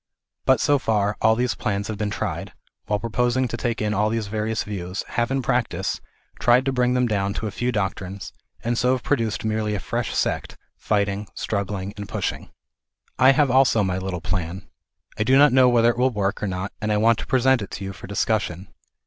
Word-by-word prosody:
But -, -, +4 dB
so 145 Hz, -1 st, +3 dB
far, 105 Hz, -4 st, +1 dB
all 110 Hz, 0 st, +5 dB
these 125 Hz, +1 st, 0 dB
plans 100 Hz, -3 st, -2 dB
that 110 Hz, -, -4 dB
have -, -, -7 dB
been 105 Hz, -1 st, -1 dB
tried, -, -, -4 dB, 0.3 s
while 105 Hz, -, +1 dB
pro 115 Hz, +2 st, -5 dB
posing 125 Hz, +2 st, +1 dB
to 120 Hz, -, -4 dB
take 120 Hz, -2 st, -2 dB
in 105 Hz, 0 st, 0 dB
all 105 Hz, +1 st, +2 dB
these 115 Hz, -1 st, -1 dB
various 110 Hz, +2 st, -2 dB
views, 95 Hz, -2 st, -5 dB
have, 120 Hz, 0 st, 0 dB
in 135 Hz, 0 st, -1 dB
practice, 120 Hz, -1 st, -1 dB, 0.4 s
tried 120 Hz, +2 st, +4 dB
to 135 Hz, -, +1 dB
bring 125 Hz, -1 st, +1 dB
them 125 Hz, 0 st, +3 dB
down 100 Hz, -3 st, -1 dB
to -, -, -3 dB
a 105 Hz, -, -3 dB
few 120 Hz, +5 st, -1 dB
doctrines, 95 Hz, -2 st, -3 dB, 0.3 s
and 120 Hz, +1 st, 0 dB
so 125 Hz, +1 st, +3 dB
have 130 Hz, -, -2 dB
produced 115 Hz, -6 st, -1 dB
merely 110 Hz, -1 st, 0 dB
a -, -, -2 dB
fresh -, -, -3 dB
sect, -, -, -1 dB, 0.2 s
fighting, 100 Hz, 0 st, -1 dB
struggling 100 Hz, -1 st, -3 dB
and 100 Hz, -1 st, -7 dB
pushing. -, -, -3 dB, 0.7 s
I 130 Hz, +1 st, +7 dB
have 140 Hz, -1 st, +3 dB
also 130 Hz, -4 st, +4 dB
my 95 Hz, -1 st, -1 dB
little 95 Hz, -2 st, -4 dB
plan. 90 Hz, 0 st, -3 dB, 0.5 s
I -, -, +3 dB
do 130 Hz, +4 st, +4 dB
not 145 Hz, -2 st, +6 dB
know 130 Hz, -1 st, +6 dB
whether 120 Hz, -1 st, +4 dB
it 120 Hz, -, -7 dB
will 130 Hz, +1 st, +4 dB
work 100 Hz, -4 st, -2 dB
or 105 Hz, -, -1 dB
not 95 Hz, +1 st, -4 dB
and 105 Hz, 0 st, -1 dB
I 105 Hz, -, +2 dB
want 115 Hz, +1 st, +3 dB
to -, -, -6 dB
present 130 Hz, -1 st, +3 dB
it 100 Hz, -, -6 dB
to -, -, -6 dB
you 95 Hz, 0 st, -5 dB
for -, -, -11 dB
discussion. 100 Hz, -3 st, -1 dB
110 Hz, 220 wpm, -23 LUFS, 100-125 Hz, 0.7 s, I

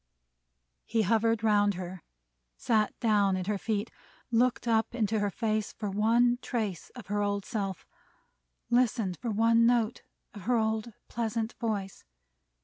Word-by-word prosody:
He 225 Hz, -1 st, +1 dB
hovered 225 Hz, +2 st, +2 dB
round 205 Hz, -2 st, +3 dB
her; 180 Hz, 0 st, -7 dB, 0.6 s
sat 215 Hz, -3 st, +1 dB
down 205 Hz, -4 st, +3 dB
at 185 Hz, -, -3 dB
her 205 Hz, 0 st, -1 dB
feet; 215 Hz, +1 st, -2 dB, 0.4 s
looked 240 Hz, +1 st, +2 dB
up 225 Hz, +1 st, +1 dB
into 220 Hz, -2 st, 0 dB
her 205 Hz, 0 st, +1 dB
face 215 Hz, +1 st, -1 dB
for 210 Hz, -3 st, -4 dB
one 235 Hz, +4 st, +3 dB
trace 215 Hz, -9 st, -3 dB
of 245 Hz, -, -9 dB
her 205 Hz, +1 st, -1 dB
old 200 Hz, -1 st, -1 dB
self; 195 Hz, -6 st, -4 dB, 0.9 s
listened 230 Hz, -7 st, +2 dB
for 235 Hz, -, -2 dB
one 230 Hz, +2 st, +4 dB
note 235 Hz, -2 st, +1 dB, 0.3 s
of 205 Hz, -, -9 dB
her 245 Hz, +1 st, +2 dB
old 220 Hz, 0 st, -1 dB
pleasant 230 Hz, -1 st, -2 dB
voice. 205 Hz, -5 st, -3 dB
220 Hz, 140 wpm, -29 LUFS, 205-230 Hz, 0.9 s, one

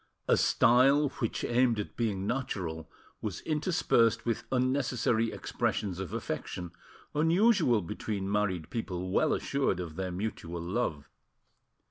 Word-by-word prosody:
A -, -, +5 dB
style 135 Hz, +5 st, +4 dB
which 115 Hz, -, -2 dB
aimed 120 Hz, -2 st, +2 dB
at 105 Hz, -, -5 dB
being 105 Hz, -5 st, -1 dB
natural 95 Hz, -11 st, -3 dB, 0.3 s
was 100 Hz, -6 st, -4 dB
interspersed 150 Hz, -, +2 dB
with 115 Hz, -1 st, -1 dB
unnecessary 125 Hz, -3 st, +1 dB
expressions 95 Hz, -4 st, -2 dB
of 95 Hz, -3 st, -5 dB
affection, 90 Hz, -1 st, -4 dB, 0.4 s
unusual 165 Hz, -, +3 dB
between 100 Hz, +1 st, -4 dB
married 95 Hz, -6 st, -1 dB
people 95 Hz, -5 st, -3 dB
well -, -, +3 dB
assured -, -, 0 dB
of 80 Hz, -3 st, -6 dB
their 95 Hz, -1 st, -2 dB
mutual 90 Hz, -3 st, -4 dB
love. 85 Hz, -5 st, -2 dB
110 Hz, 120 wpm, -30 LUFS, 95-130 Hz, 0.4 s, A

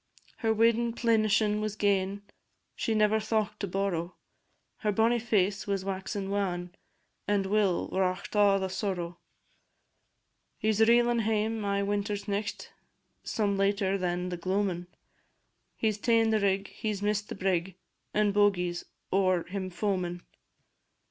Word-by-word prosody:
Her 225 Hz, -2 st, +1 dB
weddin' 230 Hz, +1 st, +3 dB
plenishin' 215 Hz, -2 st, +2 dB
was 215 Hz, -1 st, -2 dB
gane, 200 Hz, -1 st, 0 dB, 0.5 s
She 225 Hz, -, -1 dB
never 215 Hz, 0 st, +3 dB
thocht 215 Hz, -1 st, -1 dB
to 200 Hz, -, -2 dB
borrow: 185 Hz, -2 st, -2 dB, 0.6 s
Her 210 Hz, -, 0 dB
bonnie 225 Hz, +3 st, +3 dB
face 205 Hz, -4 st, 0 dB
was 195 Hz, -1 st, -1 dB
waxin' 195 Hz, 0 st, -3 dB
wan 180 Hz, -3 st, -2 dB, 0.5 s
And 205 Hz, -1 st, +1 dB
Will 200 Hz, -2 st, +1 dB
wrought 185 Hz, -1 st, -1 dB
a' 205 Hz, -1 st, +5 dB
the 190 Hz, -, -1 dB
sorrow. 185 Hz, -3 st, -3 dB, 1.4 s
He 220 Hz, -, +1 dB
's 215 Hz, +1 st, 0 dB
reelin' 235 Hz, +1 st, +5 dB
hame 220 Hz, 0 st, 0 dB
ae 200 Hz, 0 st, 0 dB
winter's 205 Hz, 0 st, -2 dB
nicht, 205 Hz, +1 st, -3 dB, 0.5 s
Some 200 Hz, -2 st, 0 dB
later 195 Hz, -1 st, +2 dB
than 180 Hz, -1 st, -1 dB
the 175 Hz, -, -4 dB
gloamin'; 185 Hz, -1 st, -1 dB, 0.9 s
He 220 Hz, -, +2 dB
's 205 Hz, -, -7 dB
ta'en 225 Hz, 0 st, +3 dB
the 220 Hz, -, +3 dB
rig, 195 Hz, -1 st, 0 dB
he 215 Hz, -, -3 dB
's 205 Hz, -1 st, -4 dB
miss'd 210 Hz, 0 st, 0 dB
the -, -, -5 dB
brig, 185 Hz, -1 st, -1 dB, 0.4 s
And 210 Hz, -1 st, +2 dB
Bogie 195 Hz, -4 st, +3 dB
's 175 Hz, -, -7 dB, 0.3 s
ower 185 Hz, -3 st, +3 dB
him 185 Hz, 0 st, -4 dB
foamin'. 180 Hz, -2 st, -2 dB
200 Hz, 140 wpm, -29 LUFS, 190-215 Hz, 1.4 s, a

